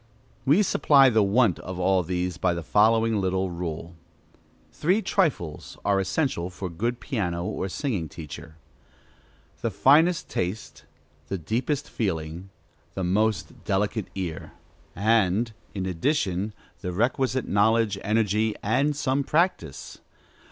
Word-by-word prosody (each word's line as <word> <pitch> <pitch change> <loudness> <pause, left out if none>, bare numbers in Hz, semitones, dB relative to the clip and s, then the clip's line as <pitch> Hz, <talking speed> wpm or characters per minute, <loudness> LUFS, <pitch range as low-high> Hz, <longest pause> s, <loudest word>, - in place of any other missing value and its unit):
We 155 +10 +5
supply 140 -7 +5
the 110 -1 +4
want 100 -1 +3
of 90 -1 -7
all 95 +1 +2
these 90 0 -2
by 90 - +1
the 85 - -4
following 110 +4 +3
little 95 0 0
rule: 85 -1 -5 0.8
Three 185 +7 +1
trifles 150 - -1
are 100 -1 +3
essential 95 - -1
for 90 0 -6
a - - -11
good 120 +8 -2
piano 90 - -2
or 95 - -3
singing 100 - -2
teacher, 80 0 -9 1.1
The - - 0
finest 160 +5 +4
taste, 95 +4 -4 0.4
The 95 - -2
deepest 125 - -2
feeling, 85 -3 -3 0.5
The 95 - -2
most 100 +1 0
delicate 105 +1 -1
ear, 90 -5 -5 0.4
and, 110 +2 +2 0.2
in 95 -2 -2
addition, 95 - -1 0.3
the 90 - -4
requisite 130 +5 0
knowledge, 105 0 +2
energy, 110 0 +1
and 135 +8 +1
some 140 -1 0
practice. 150 - -1
100 Hz, 125 wpm, -26 LUFS, 90-120 Hz, 1.1 s, We